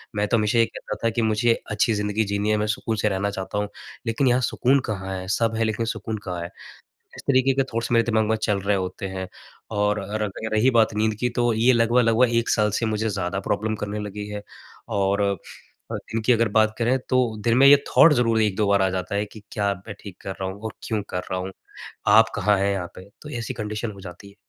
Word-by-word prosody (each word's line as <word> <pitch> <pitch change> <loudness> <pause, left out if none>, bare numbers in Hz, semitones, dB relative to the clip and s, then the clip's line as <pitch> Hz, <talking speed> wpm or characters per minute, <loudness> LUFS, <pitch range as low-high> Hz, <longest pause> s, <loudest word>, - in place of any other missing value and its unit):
मैं 105 0 +1
तो 115 - +2
हमेशा 110 +2 +2
ये 115 - +6
कहता - - -7
था 115 - +3
कि 115 +1 -1
मुझे 110 +1 +2 0.2
अच्छी 110 +1 +2
ज़िंदगी 105 +1 0
जीनी 100 +1 -1
है, 105 - +2
मैं 105 0 0
सुकून 110 +1 -2
से 105 +1 +1
रहना 100 +1 -1
चाहता 95 +1 -5
हूँ। 105 0 0 0.4
लेकिन 125 +4 +1
यहाँ 125 +1 +3
सुकून 130 +3 +2
कहाँ 95 -2 -3
है? 95 - -8
सब 115 +3 0
है, 115 - +1
लेकिन 110 +1 -1
सुकून 110 -1 -4
कहाँ 90 -2 -4
है? 85 - -6 0.7
इस - - -8
तरीके 130 0 +4
के 135 0 +2
थॉट्स 115 +1 -2
मेरे 115 -1 +4
दिमाग 110 -2 +2
में 110 - +3
चल 105 -2 +1
रहे 100 +1 +1
होते 95 +1 -4
हैं। 95 0 -5 0.5
और 105 0 +1 0.2
र 105 - -1 0.2
र 110 - -2
रही 110 +5 +4
बात 110 -3 +3
नींद 110 0 +1
की 125 - +1
तो 120 -1 +3
ये 120 +4 +4
लगभग-लगभग 115 +1 +3
1 115 - +1
साल 105 -1 +3
से 115 - 0
मुझे 110 0 -1
ज़्यादा 95 -1 -2
प्रॉब्लम 110 +2 -1
करने 105 0 -4
लगी 105 0 -5
है 105 0 -5 0.6
और 100 +1 +1
अ 100 0 +2 0.6
अ, - - -2 0.2
इनकी 115 +2 +3
अगर 115 0 +2
बात 110 0 +3
करें, 120 +3 +2
तो 125 -4 +1
दिन 120 +1 +3
में 135 - +6
ये 145 0 +9
थॉट् 160 -1 +6
ज़रूर 115 -3 +2
1-2 105 -1 +1
बार 100 -1 +3
आ 95 - +3
जाता 95 +2 -3
है 105 +1 0
कि 105 +1 -13
क्या 100 -1 0
अब 95 -1 -6
मैं 105 - -6
ठीक 100 -4 -10
कर 95 - -5
रहा 95 - -1
हूँ 100 +2 -9
और 110 - -4
क्यों 110 -3 -1
कर 90 - -2
रहा 95 - -1
हूँ? 95 +1 -5 0.6
आप 110 +2 +6
कहाँ 105 0 +2
है 100 +1 +1
यहाँ 90 -3 -3
पे? 95 +2 -12
तो 150 - -9
ऐसी 115 - -4
कंडीशन 105 +1 -4
हो 100 - -12
जाती 95 +2 -10
है। 100 - -17
105 Hz, 245 wpm, -24 LUFS, 100-115 Hz, 0.7 s, ये